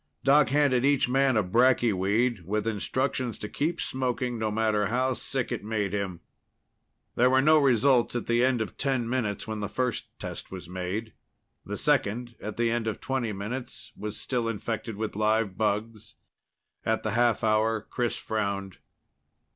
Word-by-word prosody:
Doc 140 +1 +5
handed 135 -3 +3
each 140 -1 +3
man 135 -1 +3
a 110 - +3
bracky 120 +3 +3
weed, 100 +3 +1
with 105 +4 -2
instructions 125 +2 -1
to 105 - -5
keep 165 +9 -2
smoking, 125 -2 -2
no 110 -1 0
matter 105 -1 +1
how 130 +4 +1
sick 130 0 -3
it 120 - -3
made 105 -2 -2
him. 95 -4 -3 0.9
There 125 +1 +4
were 130 +1 +4
no 155 +3 +6
results 130 -2 +3
at 120 - -2
the 120 +1 +2
end 125 -3 +2
of - - -10
ten 130 -4 0
minutes 115 -5 -2
when 110 -1 -3
the 105 0 -3
first 125 0 -1
test - - -7
was 90 -3 -7
made. 95 +5 -4 0.5
The - - -3
second, 120 +4 +1
at 105 +1 -6
the 115 0 +2
end 115 -1 -1
of 110 - -2
twenty 130 -4 -2
minutes, 105 +6 -6
was 105 0 -5
still 120 -3 -1
infected 115 0 -4
with 110 0 -4
live 110 -2 +1
bugs. 110 +1 -2 0.7
At 110 0 0
the 110 - -1
half 120 +1 +2
hour, 110 0 +2
Chris 120 -2 -1
frowned. 100 -3 -3
115 Hz, 170 wpm, -27 LUFS, 105-125 Hz, 0.9 s, no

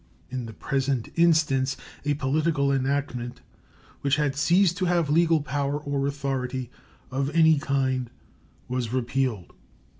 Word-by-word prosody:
In 130 -2 -4
the 110 - -8
present 135 -1 -1
instance 155 -6 +3 0.3
a 145 0 +1
political 140 0 +1
enactment 135 -2 -2 0.6
which 140 0 +2
had 150 -2 0
ceased 175 +5 +3
to 185 - 0
have 170 -4 +1
legal 165 -1 +3
power 140 +1 -1
or 140 -1 -2
authority 130 -3 -3 0.4
of 135 +1 -1
any 160 -2 +5
kind 130 -4 0 0.6
was 125 -2 -2
repealed. 125 -5 -1
140 Hz, 125 wpm, -26 LUFS, 130-150 Hz, 0.6 s, any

